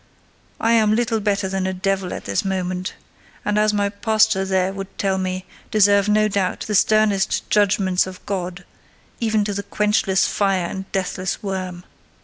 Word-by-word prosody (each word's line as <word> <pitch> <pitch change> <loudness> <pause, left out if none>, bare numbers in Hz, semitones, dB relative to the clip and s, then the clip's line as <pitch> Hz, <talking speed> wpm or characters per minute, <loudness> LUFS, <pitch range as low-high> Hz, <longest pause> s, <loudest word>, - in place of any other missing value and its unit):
I 225 - +2
am 215 -2 +4
little 230 -1 0
better 205 -1 0
than 190 0 -2
a 190 - -1
devil 190 0 -1
at - - -6
this 100 -1 0
moment; 185 -1 -3 0.5
and, 210 0 +1
as 215 0 +3
my 205 -1 +1
pastor 215 -1 +2
there 190 0 +1
would 195 0 -8
tell 190 -1 0
me, 185 0 -3 0.2
deserve 205 -1 +4
no 215 0 +4
doubt 195 -3 -1
the 215 - -3
sternest 210 -1 +2
judgments 195 -3 +2
of 185 -1 -10
God, 185 -2 -4 0.5
even 220 -3 +1
to 205 - -2
the 200 - -2
quenchless 205 -2 +1
fire 195 -3 +1
and 190 +2 -6
deathless 190 0 -2
worm. 185 -3 -4
195 Hz, 165 wpm, -21 LUFS, 190-210 Hz, 0.5 s, am